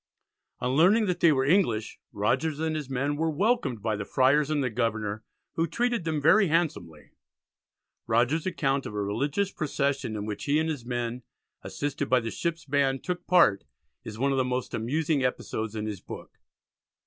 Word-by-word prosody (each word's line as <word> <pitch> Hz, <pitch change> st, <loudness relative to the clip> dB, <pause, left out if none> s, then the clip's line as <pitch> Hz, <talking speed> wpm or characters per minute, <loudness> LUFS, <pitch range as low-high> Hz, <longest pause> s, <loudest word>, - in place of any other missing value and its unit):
On 125 Hz, -, 0 dB
learning 185 Hz, -, +4 dB
that 180 Hz, -3 st, -1 dB
they 170 Hz, -, +5 dB
were 130 Hz, -2 st, +2 dB
English, 140 Hz, -, +1 dB
Rogers 145 Hz, +9 st, 0 dB
and 160 Hz, 0 st, -1 dB
his 150 Hz, -3 st, -4 dB
men 140 Hz, +3 st, -1 dB
were 160 Hz, +1 st, 0 dB
welcomed 160 Hz, -, 0 dB
by 110 Hz, -1 st, 0 dB
the 100 Hz, -, -4 dB
Friars 135 Hz, +6 st, +2 dB
and 150 Hz, -2 st, +1 dB
the 125 Hz, -, -1 dB
Governor, 110 Hz, -2 st, -2 dB, 0.3 s
who 165 Hz, +1 st, 0 dB
treated 235 Hz, +1 st, -1 dB
them 160 Hz, -2 st, 0 dB
"very 195 Hz, +8 st, +5 dB
handsomely." 140 Hz, -, -2 dB, 1.0 s
Rogers's 120 Hz, +9 st, +1 dB
account 140 Hz, -6 st, 0 dB
of 105 Hz, -, -8 dB
a 105 Hz, -, -1 dB
religious 140 Hz, -, -1 dB
procession 140 Hz, -5 st, -2 dB
in 105 Hz, -1 st, -4 dB
which 105 Hz, -1 st, -5 dB
he 145 Hz, +1 st, +2 dB
and 160 Hz, +1 st, +1 dB
his 145 Hz, -6 st, -5 dB
men, 120 Hz, 0 st, -3 dB, 0.4 s
assisted 145 Hz, -1 st, -3 dB
by 130 Hz, -, +5 dB
the 115 Hz, -1 st, -4 dB
ships' 170 Hz, -1 st, -3 dB
band, 135 Hz, -1 st, +1 dB
took 180 Hz, -1 st, -4 dB
part, 170 Hz, -, +4 dB, 0.4 s
is 110 Hz, -1 st, -8 dB
one 140 Hz, +4 st, +1 dB
of 135 Hz, -, +1 dB
the -, -, +3 dB
most 125 Hz, -1 st, -3 dB
amusing 145 Hz, +5 st, 0 dB
episodes 110 Hz, -3 st, -2 dB
in 105 Hz, -1 st, -3 dB
his 105 Hz, -4 st, -5 dB
book. -, -, -10 dB
140 Hz, 185 wpm, -27 LUFS, 115-160 Hz, 1.0 s, they